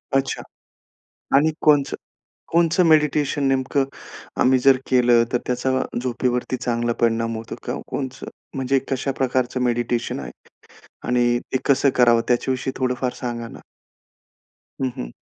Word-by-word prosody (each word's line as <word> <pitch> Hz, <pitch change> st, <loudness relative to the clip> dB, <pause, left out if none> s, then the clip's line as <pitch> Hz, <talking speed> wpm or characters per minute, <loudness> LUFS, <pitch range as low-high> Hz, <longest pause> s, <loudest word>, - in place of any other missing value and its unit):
अच्छा. 135 Hz, 0 st, 0 dB, 1.0 s
आणि 150 Hz, +3 st, +4 dB
कोणचं 145 Hz, -3 st, +3 dB, 0.6 s
कोणचं 170 Hz, +1 st, +3 dB
मेडिटेशन 150 Hz, -2 st, +2 dB
नेमकं 135 Hz, +1 st, +1 dB, 0.6 s
आम्ही 130 Hz, 0 st, +4 dB
जर 135 Hz, +1 st, +5 dB
केलं, 120 Hz, -2 st, +5 dB
तर 125 Hz, -, +4 dB
त्याचा 125 Hz, +1 st, -1 dB, 0.3 s
झोपेवरती 125 Hz, 0 st, -1 dB
चांगला 120 Hz, -1 st, -1 dB
परिणाम 115 Hz, 0 st, +1 dB
होतो 115 Hz, -, -7 dB
का -, -, -3 dB, 0.2 s
कोणचं? 130 Hz, -1 st, -5 dB, 0.3 s
म्हणजे 135 Hz, 0 st, +1 dB
कशा 135 Hz, +1 st, -1 dB
प्रकारचं 130 Hz, -1 st, 0 dB
मेडिटेशन 120 Hz, -, -1 dB
आहे? 65 Hz, -3 st, -7 dB, 0.8 s
आणि 120 Hz, -1 st, +2 dB
ते 130 Hz, -, +2 dB
कसं 140 Hz, 0 st, +3 dB
करावं? 120 Hz, -2 st, +5 dB
त्याच्याविषयी 130 Hz, +1 st, 0 dB
थोडंफार 125 Hz, -1 st, -1 dB
सांगा 120 Hz, -2 st, -4 dB
ना. -, -, -11 dB, 1.2 s
हं, 130 Hz, -, +1 dB
हं. -, -, -5 dB
125 Hz, 125 wpm, -22 LUFS, 120-135 Hz, 1.2 s, जर